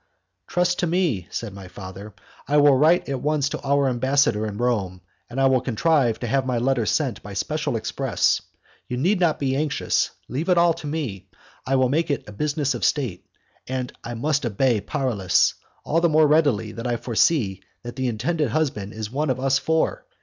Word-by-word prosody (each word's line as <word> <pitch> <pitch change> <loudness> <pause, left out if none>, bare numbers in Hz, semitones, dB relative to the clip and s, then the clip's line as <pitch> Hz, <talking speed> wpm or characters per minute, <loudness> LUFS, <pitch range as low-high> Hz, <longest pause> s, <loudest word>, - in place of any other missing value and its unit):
"Trust 180 0 +1
to 175 - +1
me," 160 - 0
said 110 -2 -5
my 95 -2 -10
father, 95 +2 -10 0.3
"I 150 - +2
will 145 -2 +6
write 155 +6 +4
at 135 -2 -3
once 150 -2 +1
to - - -5
our 140 0 +2
ambassador 130 -3 +2
in 105 -1 -6
Rome, 105 -7 -1 0.3
and 120 +3 -4
I 135 - +4
will 130 -2 +3
contrive 130 -2 +1
to 120 - -2
have 135 +3 +1
my 130 -2 -1
letter 120 -2 +1
sent - - 0
by - - -9
special - - -2
express. - - 0 0.5
You 125 - -3
need 180 +9 +2
not 170 -4 +2
be 135 -2 -1
anxious, 150 +1 0 0.2
leave 155 +8 -3
it 180 - +4
all 170 0 +5
to 160 -2 -8
me, 120 - -4 0.4
I 135 - +2
will 130 -1 +3
make 155 +4 0
it 140 - -1
a - - -8
business 145 +4 -1
of - - -5
state, 125 -12 -1 0.4
and 130 -1 -3
I 120 +1 -5
must 145 +4 0
obey 120 0 +1
Paralis 105 -9 +1 0.3
all 165 +2 +1
the 170 - +3
more 155 0 +5
readily 145 -8 +2
that 115 +2 -5
I 120 -1 0
foresee 115 - +1 0.2
that 120 0 -7
the 130 -1 -1
intended 140 +6 -1
husband 110 -7 -2
is 110 0 -6
one 145 +3 -1
of 130 -1 0
us 135 0 +2
four. 160 0 0
130 Hz, 200 wpm, -23 LUFS, 115-150 Hz, 0.5 s, will